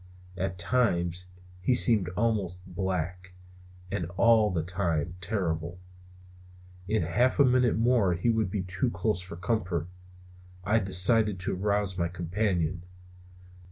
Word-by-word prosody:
At 95 0 -3
times 90 -4 0 0.3
he 125 +7 +2
seemed 110 -8 +5
almost 100 -5 -1
black; 90 -1 -4 0.6
and 95 -5 -2
all 115 -2 +4
the 85 -4 -2
time 85 -2 -1
terrible. 85 -3 -2 1.1
In 110 -2 0
half 120 +11 +1
a 140 - +6
minute 125 -3 +2
more 115 -6 +2
he 105 +8 +1
would 110 -4 0
be 100 -1 -3
too 90 +6 -2
close 110 -5 -1
for 90 -2 -8
comfort, 90 -3 -2 0.8
and 105 +3 +1
I - - +4
decided 95 +2 +3
to 90 - -2
arouse 100 -1 -1
my 85 - +1
companion. 90 -1 -2
95 Hz, 130 wpm, -28 LUFS, 90-110 Hz, 1.1 s, a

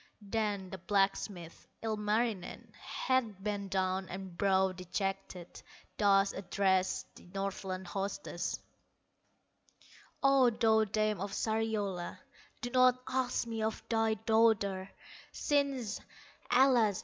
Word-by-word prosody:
Then 205 -4 -1
the 190 - -6
blacksmith, 195 -2 -1 0.2
Ilmarinen, 215 -2 -1
Head 230 -7 -1
bent 200 -2 -2
down 190 0 0
and 190 -1 -7
brow 190 0 +3
dejected, 185 0 -4 0.4
Thus 195 -1 +4
addressed 190 0 +1
the - - -15
Northland 190 -1 -3
hostess: 195 -2 -3 1.6
"O, 275 -2 +6
thou 220 -1 +3
dame 215 -1 0
of 200 0 -4
Sariola, 215 -5 -1 0.4
Do 245 -1 -4
not 255 0 +5
ask 260 -2 0
me 225 -1 -4
of 220 0 -2
thy 225 -1 +2
daughter, 215 -3 +2 0.4
Since, 275 -7 0 0.5
alas! 245 -6 +4
205 Hz, 100 wpm, -33 LUFS, 190-225 Hz, 1.6 s, O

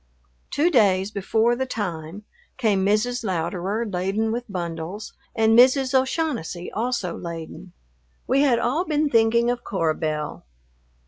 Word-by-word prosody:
Two 315 +5 +2
days 200 - +3
before 220 +4 +1
the 260 +2 -2
time, 180 -4 -5 0.3
came 210 -6 +2
Mrs. 215 +5 +1
Louderer, 190 +3 -2
laden 200 +3 -1
with 240 -1 -4
bundles, 170 +3 -5 0.2
and 225 0 +4
Mrs. 260 +2 +5
O'Shaughnessy, 260 - -1
also 220 -6 -2
laden. 170 +1 -8 0.5
We 275 - +2
had 265 -5 +4
all 250 +9 0
been 300 -4 0
thinking 235 +1 +3
of 245 0 -4
Cora 165 -5 0
Belle. 155 -1 -3
220 Hz, 130 wpm, -23 LUFS, 180-245 Hz, 0.5 s, Mrs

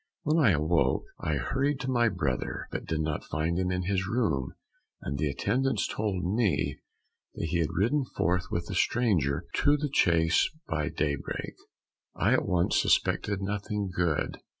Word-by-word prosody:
When 155 +2 +3
I 120 - +6
awoke, 80 0 +2 0.2
I 80 - -1
hurried 135 - 0
to 130 - -2
my 120 -2 +3
brother, 75 -10 -2
but - - -5
did 80 -1 -1
not 75 -1 -2
find 80 +3 0
him 90 -1 0
in 90 0 -1
his 95 0 0
room, 95 - 0 0.5
and 70 - -3
the 75 - +1
attendants 110 - 0
told 100 -4 -2
me 100 +1 0 0.6
that 80 - -3
he 85 - 0
had 80 - +1
ridden 120 - +1
forth 90 +2 +1
with 85 0 -2
the 95 - -6
stranger 85 - +1
to 145 +1 +4
the 150 0 -2
chase 80 -5 +3 0.2
by 75 -2 -1
daybreak. 75 -2 -3 0.6
"I - - +2
at - - +1
once 90 -1 +2
suspected 100 -1 +1
nothing 100 0 -2
good. 85 -4 0
90 Hz, 165 wpm, -28 LUFS, 80-110 Hz, 0.6 s, I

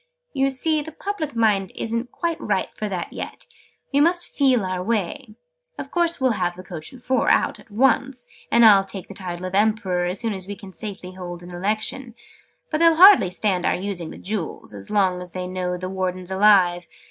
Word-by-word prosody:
"You 270 0 +2
see 305 +4 0
the 320 +2 -8
public 320 -5 -4
mind 210 -4 +2
isn't 230 +2 -3
quite 335 -2 -3
ripe - - -1
for 215 - -5
it 185 -4 -3
yet. - - -7 0.5
We 280 - +4
must 345 +4 +2
feel 260 -7 +3
our 185 -1 -2
way. 215 +3 -2 0.4
Of - - -7
course 340 -2 +1
we'll 260 -1 +2
have 175 0 0
the 185 - -10
coach 160 -4 -6
and 250 -2 -14
four 260 -1 +1
out, - - +2
at - - -18
once. 250 +2 +1 0.2
And 235 0 +6
I'll 200 -3 +7
take 195 -1 -6
the - - -8
title 180 -2 -6
of 185 - -5
Emperor, 200 -3 +1
as 180 +2 -2
soon 225 -2 -1
as 190 -1 -6
we 205 - -5
can 195 -2 -12
safely 200 -3 -7
hold 175 -1 -8
an 175 - -10
Election. 215 +7 -2 0.6
But 305 - 0
they'll 330 -1 +5
hardly 365 - +8
stand 185 0 0
our - - +2
using 180 -3 -4
the - - -10
Jewels, 190 - -5
as 100 -1 -10
long 190 -3 +1
as 180 -2 -10
they 185 -1 -4
know 180 -1 -3
the 185 +1 -5
Warden's 185 -1 -3
alive. 190 -3 +4
200 Hz, 205 wpm, -23 LUFS, 180-250 Hz, 0.6 s, hardly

